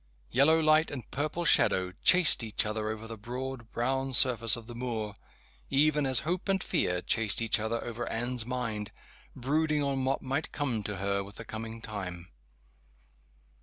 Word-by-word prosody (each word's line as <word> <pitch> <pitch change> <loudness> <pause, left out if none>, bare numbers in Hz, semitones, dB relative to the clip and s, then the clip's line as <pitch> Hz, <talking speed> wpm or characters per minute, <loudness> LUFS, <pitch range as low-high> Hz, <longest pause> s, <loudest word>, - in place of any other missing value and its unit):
Yellow 155 +5 +5
light 155 0 +4
and 130 -6 -8
purple 155 +4 -2
shadow 95 - +4
chased 180 -6 +6
each 110 -2 -1
other 110 0 -2
over 110 0 -5
the 115 -1 -8
broad 125 +1 -6
brown 130 +3 -1
surface 120 -3 +3
of 120 -2 -10
the 120 - -9
moor 115 -4 -4 0.6
even 150 0 +3
as 130 -2 +6
hope 180 +5 -3
and 195 -1 +1
fear 90 0 0
chased 110 -3 +1
each 115 -1 +2
other 110 +2 -2
over 120 0 -5
Anne's 120 +1 +1
mind, 115 -4 -4 0.4
brooding 150 +3 0
on 135 -1 -1
what 135 +1 -1
might 135 +4 -2
come 130 -7 -2
to 105 0 -5
her 100 +1 -1
with 100 0 -12
the 115 - -9
coming 115 +1 -7
time. 90 -4 -6
120 Hz, 165 wpm, -29 LUFS, 110-140 Hz, 0.6 s, chased